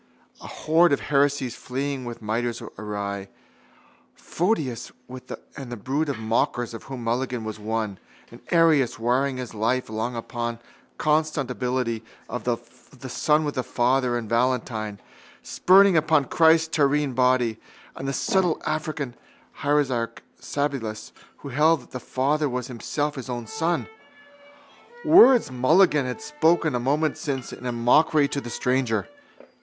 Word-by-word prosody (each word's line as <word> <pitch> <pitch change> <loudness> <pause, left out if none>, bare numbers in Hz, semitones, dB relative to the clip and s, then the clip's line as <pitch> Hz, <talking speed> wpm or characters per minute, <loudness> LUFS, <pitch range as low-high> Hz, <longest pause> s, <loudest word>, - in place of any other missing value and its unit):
A - - -9
horde 160 0 +3
of - - +2
heresies 140 -3 +1
fleeing 135 0 -4
with 120 -1 -7
mitres 115 +2 -2 0.2
awry: 100 -1 -5 0.9
Photius 160 - -2 0.6
and 135 -4 -8
the 120 - -5
brood 140 +8 -1
of 140 - -2
mockers 115 +1 -1
of 115 - -9
whom 130 -3 -7
Mulligan 125 0 -1
was 110 0 -6
one, 110 -2 -3 0.3
and - - -13
Arius, 160 -7 +3
warring 130 +3 0
his 125 -3 -6
life 115 +3 -1
long 110 +3 -3
upon 120 0 -4
the 115 - -21 0.4
consubstantiality 130 -6 0 0.2
of 125 - -5
the 125 +2 -6
Son 150 +5 +2
with 145 - -2
the 130 - -1
Father, 125 0 +1
and 115 -2 -5
Valentine, 115 -3 -1 0.4
spurning 190 -3 +5
Christ's 160 +2 +3
terrene 145 -2 +2
body, 125 -3 +2 0.4
and 135 - -6
the - - 0
subtle 180 +4 +1
African 155 -4 -3 0.5
heresiarch 140 -5 0 0.2
Sabellius 135 -7 -3 0.3
who - - -5
held 150 +3 +3
that - - -21
the 125 - -5
Father 140 +4 0
was 125 -1 -3
Himself 145 +5 -2
His 130 -2 -8
own 120 -2 -4
Son. 160 +7 -1 1.2
Words 260 - +7
Mulligan 150 +3 +3
had 125 +3 -5
spoken 155 +1 +2
a 125 - 0
moment 145 +5 0
since 135 -4 -4
in 125 0 -5
mockery 145 +5 +4
to 140 - -3
the 120 - -7
stranger. 120 -1 0
130 Hz, 140 wpm, -24 LUFS, 120-150 Hz, 1.2 s, Words